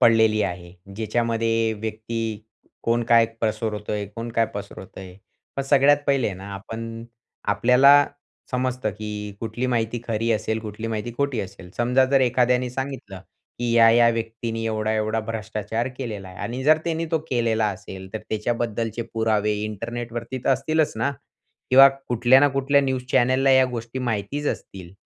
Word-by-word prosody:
पडलेली 110 -2 +5
आहे. 85 0 -4 0.2
ज्याच्यामध्ये 115 0 0
व्यक्ती, 110 0 -4 0.4
कोण 115 +1 +1
काय 115 -1 +6
पसरवतोय 105 -2 -2
कोण 115 0 -5
काय 115 -1 +2
पसरवतोय. 95 -2 -9 0.4
पण 135 - 0
सगळ्यात 140 +1 +5
पहिले 135 -7 +2
ना 95 +2 -9
आपण, 115 +3 -7 0.4
आपल्याला 140 +4 +6 0.5
समजतं 125 -3 -1
की 105 0 -6
कुठली 115 +3 -3
माहिती 115 -1 -1
खरी 115 0 -1
असेल, 110 0 -1
कुठली 110 +1 -6
माहिती 115 +1 -3
खोटी 140 -4 0
असेल. 95 -2 -9
समजा 125 +2 +3
जर 135 +1 +3
एखाद्याने 125 0 +2
सांगितलं 130 -7 -6 0.4
की 120 -1 -1
या-या 115 0 +6
व्यक्तीनी 115 0 -3
एवढा-एवढा 110 0 0
भ्रष्टाचार 110 +1 -3
केलेला 105 -7 -5
आहे. 90 - -12
आणि 125 +2 -4
जर 155 +2 +6
त्यांनी 165 0 -1
तो 160 - +2
केलेला 115 -3 +1
असेल, 95 -1 -9
तर - - -1
त्याच्याबद्दलचे 115 +1 -2
पुरावे 110 -2 +1
इंटरनेटवरती 120 +3 -5
तर - - 0
असतीलच 155 +4 +1
ना? 115 +5 0 0.6
किंवा 135 +2 +9 0.2
कुठल्या 120 +2 +5
ना 145 - +5
कुठल्या 135 +1 +2
न्यूज 130 -2 -1
चॅनलला 130 +1 +3
या 130 0 +6
गोष्टी 115 +1 -5
माहितीच 125 +5 -2
असतील. 90 -2 -5
115 Hz, 145 wpm, -23 LUFS, 110-125 Hz, 0.6 s, किंवा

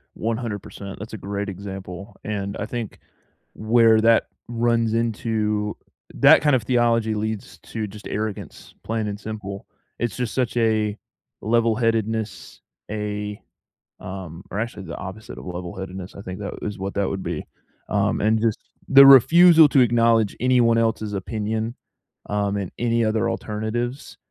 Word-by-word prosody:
100%, 110 -4 -5
that's 110 +2 -8
a 110 - -4
great 100 +1 -4
example. 95 -1 -8
And 100 -2 -3
I 100 - -2
think 115 -1 -6 0.5
where 110 0 +4
that 115 0 +4 0.2
runs 115 -1 +1
into 110 -2 -1 0.4
that - - +7
kind 145 -3 +4
of 120 - 0
theology 115 -2 +2
leads 110 0 -4
to 110 -2 -5
just 105 +1 -10
arrogance, 110 -1 -5
plain 110 -1 -2
and 100 0 -5
simple. 105 -3 -7 0.3
It's 120 -3 -2
just 125 -3 -3
such 125 -2 -1
a 110 -2 +1 0.4
level-headedness, 110 -2 0 0.3
a, 105 -1 -4 0.6
um 90 -2 -8
or 100 - -3
actually, 115 -3 -4
the 85 -2 -7
opposite 100 +4 -8
of - - -9
level-headedness 90 +2 -7
I - - -8
think 95 -1 -7
that 100 -1 -5
is 105 - -4
what 95 +1 -4
that 100 -1 0
would 95 -1 -4
be. 85 -3 -4 0.4
Um, - - +1
and 110 +1 +3
just 115 -2 +1 0.3
the 140 0 +9
refusal 160 +4 +8
to 140 - +4
acknowledge 115 -3 +3
anyone 120 -2 +3
else's 110 -2 0
opinion, 110 +3 -3 0.5
um, 100 -1 -1
and 95 -3 -4
any 115 -1 +1
other 110 +1 +1
alternatives 115 +4 -4
110 Hz, 145 wpm, -23 LUFS, 100-115 Hz, 0.6 s, the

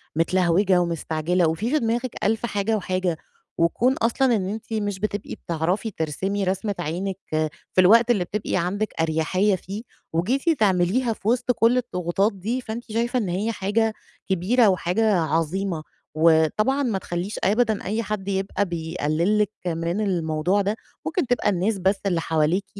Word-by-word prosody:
متلهوجة 180 +2 +3
ومستعجلة 170 +1 0
وفي، 190 - -1
في 305 - +3
دماغِك 235 +2 -1
ألف 225 +3 +1
حاجة 205 0 0
وحاجة، 185 -3 -1 0.4
وكون 230 +10 +2
أصلًا 240 0 +2
إن 190 -2 -1
أنتِ 220 +1 -6
مش 205 -3 -2
بتبقي 210 -1 -3
بتعرفي 175 +7 -2
ترسمي 190 +5 -2
رسمة 195 +2 -1
عينِك 180 +4 -3 0.5
في 185 - +5
الوقت 230 +6 +6
اللي 195 -6 +2
بتبقي 200 +1 -2
عندِك 200 +5 -1
أريحية 165 +5 +1
فيه 195 +4 -7 0.3
وجيتِ 265 - +1
تعمليها 205 +5 +2
في 210 - -9
وسط 245 +1 +2
كل 235 +1 +3
الضغوطات 195 -3 0
دي، 225 +7 -3
فأنتِ 230 +1 -6
شايفة 235 +3 0
إن 200 -5 -2
هي 205 +6 -1
حاجة 215 +2 0 0.4
كبيرة 210 +6 +3
وحاجة 195 +4 +1
عظيمة. 165 +2 -1 0.4
وطبعًا 170 - +3
ما 225 -6 0
تخلّيش 175 +3 -4
أبدًا 220 +1 +2
أي 220 +4 -1
حد 210 -2 -4
يبقى 195 +1 -1
بيقلل 170 +3 0
لِك 210 0 +1 0.2
من 170 +4 -1
الموضوع 175 0 +1
ده، 205 +2 0 0.3
ممكن 355 - -1
تبقى 245 -4 +1
الناس 200 +3 0
بس 190 +2 +1
اللي 175 -4 +1
حواليكِ 165 +5 +1
195 Hz, 155 wpm, -24 LUFS, 175-220 Hz, 0.5 s, الوقت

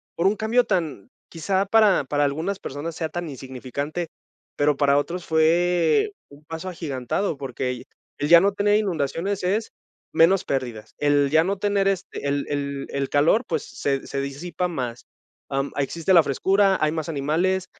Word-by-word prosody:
por 170 - +2
un 205 +2 +1
cambio 225 +3 +2
tan, 165 - -2 0.2
quizá, 190 +4 -1
para 205 -7 +4
para 145 +2 0
algunas 160 +8 -1
personas 150 +4 -6
sea 160 -1 -3
tan 175 -1 -4
insignificante, 135 +5 -5 0.5
pero 145 -1 +2
para 140 -1 +3
otros 170 +5 -2
fue 170 - +3 0.2
un 145 +1 -17
paso 165 +3 -6
agigantado, 155 +1 -2
porque 125 -2 -4 0.4
el 145 - -1
ya 170 0 +9
no 200 +2 +2
tener 205 +1 +3
inundaciones 185 0 -1
es 210 +5 0 0.4
menos 175 +4 +4
pérdidas. 120 -5 -4
El 145 -1 +2
ya 160 +1 +5
no 195 +3 -1
tener, 200 0 +1
este, 190 -6 -4
el 140 0 0
el 140 -1 -3
el 140 -1 -2
calor, 160 - +3
pues, - - -2
se 135 -1 -2
se 140 - -3
disipa 160 +6 -3
más. 125 -7 -5 0.4
Em, 135 +1 -1
existe 165 +6 0
la 170 -3 +7
frescura, 190 +7 +2
hay 155 0 +2
más 160 0 -3
animales, 165 +6 0
160 Hz, 165 wpm, -24 LUFS, 140-190 Hz, 0.5 s, ya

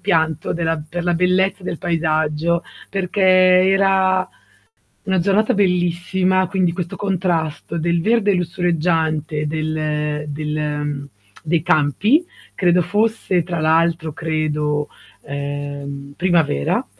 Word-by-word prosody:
pianto 160 -5 0
della 165 -2 -1
per 175 +2 -4
la 175 - +2
bellezza 185 +2 +1
del 170 - -4
paesaggio, 160 -1 0 0.3
perché 195 0 -3
era 185 0 +4 0.8
una 190 -1 0
giornata 200 +4 +2
bellissima, 185 0 +1
quindi 185 -2 +1
questo 175 -1 -5
contrasto 170 -5 -2
del 170 +1 0
verde 215 0 +2
lussureggiante 165 -3 0
del 150 -1 -2
del 150 -1 -3 0.4
dei 160 0 0
campi, 180 - +2 0.3
credo 180 -1 +2
fosse 205 -1 0
tra 170 -1 -4
l'altro 160 0 +1
credo, 150 -2 -1 0.3
ehm, 140 0 -6
primavera. 165 - +1
170 Hz, 100 wpm, -20 LUFS, 155-185 Hz, 0.8 s, era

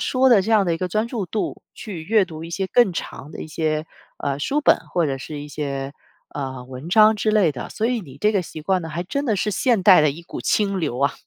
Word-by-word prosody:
说 260 0 +3
的 220 -5 +7
这 210 - -3
样 215 -3 +5
的 175 - 0
一 165 - -2
个 185 - -2
专 215 +5 0
注 230 -6 -4
度 210 +5 -3
去 190 -8 -7
阅 215 +3 +3
读 160 -3 -9
一 165 - -7
些 190 +3 -2
更 235 0 +4
长 150 -3 -6
的 - - -7
一 - - -7
些， 155 0 -2 0.3
呃， 140 -1 -2
书 285 - -1
本， - - +5
或 175 - +2
者 135 -3 -2
是 150 +2 -7
一 145 - -7
些， 140 -2 -4 0.4
呃， 130 -3 -5
文 130 +4 -9
章 215 +3 +6
之 215 +1 0
类 205 -7 +3
的。 125 - -6
所 220 - -2
以 245 -1 0
你 140 -9 -12
这 210 +1 +2
个 200 - +2
习 155 -2 -9
惯 190 +2 +1
呢 165 - -6
还 165 +3 -3
真 280 +11 -3
的 220 -4 +1
是 210 +3 0
现 225 0 +1
代 185 -3 +8
的 150 -1 +3
一 160 +5 -9
股 170 - -7
清 200 -3 +1
流 145 -7 -2
啊。 140 - +2
180 Hz, 290 characters per minute, -22 LUFS, 150-215 Hz, 0.4 s, 代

